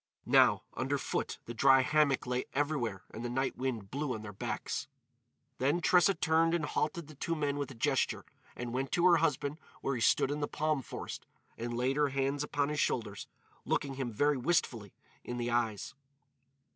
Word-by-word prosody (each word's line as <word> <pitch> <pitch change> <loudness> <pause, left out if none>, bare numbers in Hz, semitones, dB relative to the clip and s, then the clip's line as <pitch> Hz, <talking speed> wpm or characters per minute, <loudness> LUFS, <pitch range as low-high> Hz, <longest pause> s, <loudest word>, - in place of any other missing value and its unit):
Now, - - +5
under - - -1
foot, - - -2
the 120 - -6
dry 135 +2 +6
hammock 145 0 +2
lay 125 0 -1
everywhere 135 -9 -1
and 115 - -7
the 120 - -2
night 130 +2 -1
wind 120 -7 -3
blew 140 -2 -2
on 110 - -7
their 105 -1 -7
backs. 95 - -3 0.7
Then 145 +6 +2
Tressa 180 +2 +4
turned 165 0 +3
and 160 -3 0
halted 150 +2 -1
the 155 - -12
two 165 +4 -2
men 145 -2 -1
with 140 - -2
a 135 - -10
gesture. 115 - 0 0.3
And 120 -1 -5
went 135 +1 -2
to 175 - +3
her 175 -2 +7
husband 150 -1 0 0.2
where 135 - -1
he 120 - -3
stood 135 - +3
in 145 - -2
the 145 - -1
palm 155 -1 0
forest, - - -7 0.3
and 120 +1 -4
laid 130 +3 +1
her 145 -1 +3
hands 135 +1 0
on 145 -1 +1
his 150 -1 -2
shoulders, 105 -7 -1 0.4
looking 140 -1 -1
him 130 -3 -3
very 145 +6 +2
wistfully 120 - 0 0.3
in 120 - -5
the 120 0 -2
eyes. 115 -4 -1
135 Hz, 190 wpm, -32 LUFS, 120-150 Hz, 0.7 s, her